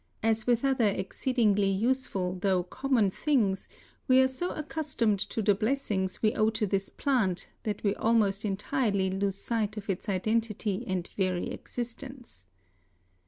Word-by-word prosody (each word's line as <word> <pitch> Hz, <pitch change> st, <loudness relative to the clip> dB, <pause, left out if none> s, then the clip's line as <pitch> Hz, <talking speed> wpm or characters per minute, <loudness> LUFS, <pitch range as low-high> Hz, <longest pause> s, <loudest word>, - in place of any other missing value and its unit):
As 220 Hz, 0 st, +1 dB
with 240 Hz, +1 st, +2 dB
other 260 Hz, -5 st, +3 dB
exceedingly 205 Hz, +1 st, +1 dB
useful, 195 Hz, -3 st, 0 dB
though 190 Hz, -3 st, +2 dB
common 240 Hz, 0 st, +1 dB
things, 215 Hz, -8 st, +1 dB, 0.4 s
we 260 Hz, -1 st, +6 dB
are 260 Hz, -, +6 dB
so 260 Hz, +8 st, -3 dB
accustomed 295 Hz, -9 st, -1 dB
to 220 Hz, +2 st, -2 dB
the 205 Hz, 0 st, +5 dB
blessings 215 Hz, -4 st, -1 dB
we 215 Hz, -, +4 dB
owe 215 Hz, 0 st, +3 dB
to 220 Hz, -1 st, -1 dB
this 195 Hz, 0 st, -1 dB
plant 205 Hz, -10 st, 0 dB, 0.2 s
that 210 Hz, -2 st, -3 dB
we 200 Hz, -2 st, +2 dB
almost 210 Hz, -3 st, +2 dB
entirely 205 Hz, -1 st, 0 dB
lose 195 Hz, 0 st, -1 dB
sight 220 Hz, 0 st, -1 dB
of 200 Hz, -1 st, -2 dB
its 195 Hz, +3 st, -5 dB
identity 215 Hz, +1 st, 0 dB
and 185 Hz, -2 st, -2 dB
very 185 Hz, -2 st, -1 dB
existence. 245 Hz, -, -7 dB
215 Hz, 145 wpm, -29 LUFS, 195-245 Hz, 0.4 s, we